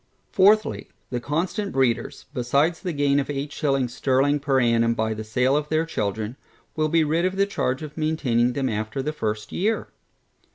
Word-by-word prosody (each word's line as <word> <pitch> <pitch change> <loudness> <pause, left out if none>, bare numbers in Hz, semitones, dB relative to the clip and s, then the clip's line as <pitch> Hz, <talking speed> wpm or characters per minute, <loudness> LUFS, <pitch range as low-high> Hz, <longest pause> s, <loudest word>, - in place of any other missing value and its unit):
Fourthly, 210 +2 +3 0.2
The 125 - -1
constant 175 - -2
breeders, 130 -3 0
besides 140 +6 +1
the 180 - -3
gain 145 -2 +2
of 140 - -3
eight 145 0 -3
shillings 135 -6 0
sterling 140 +3 +2
per 140 -2 +1
annum 115 -1 +2
by 110 -1 0
the 110 0 -6
sale 125 +5 +1
of 150 0 -1
their 155 +1 +1
children, 110 -4 -3 0.4
will 155 0 +1
be 165 +1 +3
rid 160 +3 +1
of 185 +1 0
the 195 +1 +3
charge 135 -8 -2
of 150 -1 -8
maintaining 130 -7 +1
them 135 -1 -1
after 110 +3 -3
the 150 +2 -2
first 110 -6 -3
year. 215 +4 -1
140 Hz, 180 wpm, -24 LUFS, 120-155 Hz, 0.4 s, Fourthly